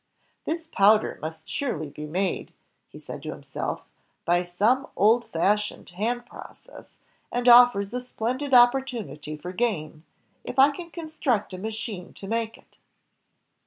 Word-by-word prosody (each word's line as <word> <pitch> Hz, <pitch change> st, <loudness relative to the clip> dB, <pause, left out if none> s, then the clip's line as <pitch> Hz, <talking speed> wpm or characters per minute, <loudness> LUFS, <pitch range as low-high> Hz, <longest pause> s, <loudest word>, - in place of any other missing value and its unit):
"This 325 Hz, +1 st, -3 dB
powder 210 Hz, -7 st, +3 dB
must 160 Hz, +1 st, -7 dB
surely 155 Hz, -, -3 dB
be 150 Hz, +1 st, -7 dB
made," 185 Hz, +4 st, -2 dB, 0.4 s
he -, -, -13 dB
said -, -, -8 dB
to -, -, -5 dB
him -, -, -10 dB
self, -, -, -4 dB, 0.4 s
"by 175 Hz, +1 st, +2 dB
some 215 Hz, -, +1 dB
old 230 Hz, +4 st, +4 dB
fashioned 210 Hz, +4 st, -1 dB
hand 235 Hz, +6 st, -2 dB
process, -, -, -13 dB, 0.4 s
and 245 Hz, 0 st, -1 dB
offers 240 Hz, -4 st, +7 dB
a 250 Hz, -, -2 dB
splendid 250 Hz, +3 st, -3 dB
opportunity 240 Hz, -, +2 dB
for 180 Hz, +4 st, -7 dB
gain, 165 Hz, -9 st, -2 dB, 0.4 s
if 250 Hz, -, -7 dB
1 275 Hz, +2 st, +7 dB
can 340 Hz, +2 st, -8 dB
construct 310 Hz, -, -2 dB
a 185 Hz, -, -6 dB
machine 215 Hz, -3 st, -5 dB
to -, -, -10 dB
make 225 Hz, +1 st, -2 dB
it." -, -, -25 dB
220 Hz, 145 wpm, -26 LUFS, 180-250 Hz, 0.4 s, offers